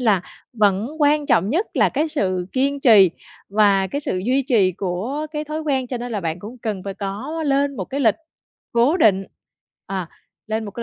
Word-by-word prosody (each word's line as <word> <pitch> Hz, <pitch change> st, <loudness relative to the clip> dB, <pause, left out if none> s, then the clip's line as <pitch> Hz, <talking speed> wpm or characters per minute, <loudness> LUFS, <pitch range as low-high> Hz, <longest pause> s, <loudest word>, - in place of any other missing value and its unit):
là 215 Hz, -7 st, +3 dB, 0.3 s
vẫn 210 Hz, -1 st, +2 dB
quan 295 Hz, 0 st, +3 dB
trọng 190 Hz, +5 st, +2 dB
nhất 350 Hz, -, +1 dB
là -, -, +4 dB
cái 305 Hz, +4 st, -1 dB
sự 185 Hz, -, -1 dB
kiên 275 Hz, +2 st, 0 dB
trì 210 Hz, -9 st, +7 dB, 0.4 s
và 200 Hz, -2 st, +3 dB
cái 280 Hz, +10 st, -3 dB
sự 185 Hz, -10 st, -2 dB
duy 255 Hz, +8 st, +1 dB
trì 205 Hz, -9 st, +3 dB
của 205 Hz, -, -3 dB
cái 300 Hz, 0 st, -3 dB
thói 305 Hz, +1 st, -4 dB
quen, 270 Hz, -4 st, -1 dB
cho 250 Hz, 0 st, -4 dB
nên 245 Hz, 0 st, -5 dB
là 205 Hz, -, -2 dB
bạn 165 Hz, 0 st, -3 dB
cũng 220 Hz, +7 st, -10 dB
cần 210 Hz, -5 st, -4 dB
phải 195 Hz, -, -5 dB
có 205 Hz, +13 st, -4 dB
lên 280 Hz, 0 st, +1 dB
một -, -, -3 dB
cái 275 Hz, +1 st, -4 dB
lịch 225 Hz, -6 st, +4 dB, 0.6 s
cố 245 Hz, +8 st, +3 dB
định. 195 Hz, -, +3 dB, 0.6 s
À, 190 Hz, -3 st, -4 dB, 0.4 s
lên 220 Hz, +1 st, -2 dB
một 205 Hz, -, -6 dB
cái 235 Hz, -, -6 dB
225 Hz, 205 wpm, -21 LUFS, 195-280 Hz, 0.6 s, trì